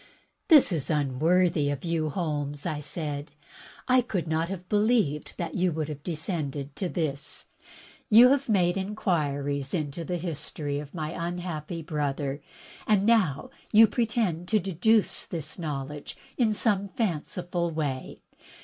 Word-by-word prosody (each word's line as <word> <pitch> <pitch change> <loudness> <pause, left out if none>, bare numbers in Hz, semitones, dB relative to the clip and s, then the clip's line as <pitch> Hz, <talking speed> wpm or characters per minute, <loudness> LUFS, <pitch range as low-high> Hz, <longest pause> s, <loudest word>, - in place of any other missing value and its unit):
"This 305 - +7
is 160 -6 -1
unworthy 155 +2 +2
of 145 +3 -3
you. 165 -2 0
Holmes," 145 -3 -3
I 155 -4 -2
said. 150 -1 -4 0.6
"I 255 0 +5
could 195 -8 -3
not 160 +2 0
have 180 -2 -6
believed 210 -8 +1
that 170 - -3
you 180 0 +1
would 155 -1 -2
have 150 -2 -6
descended 150 -4 -3
to 185 - -1
this. 150 -5 -3 0.6
You 235 +3 +9
have 275 -2 +1
made 180 -3 +3
inquiries 145 -8 -1
into 155 0 -3
the 175 +2 -2
history 150 -3 -4
of 145 +3 -9
my 155 -2 -3
imhappy 170 -1 -4
brother, 145 -2 -2 0.5
and 210 -3 +4
you - - -1
now 210 -11 +2 0.4
pre 235 0 +1
tend 180 -7 -1
to 215 - +3
deduce 195 +3 +2
this 160 0 -6
knowledge 145 -2 -5 0.2
in 230 -4 +2
some 205 -2 +1
fanciful 175 -3 -2
way. 145 -5 -4
165 Hz, 140 wpm, -27 LUFS, 145-190 Hz, 0.6 s, You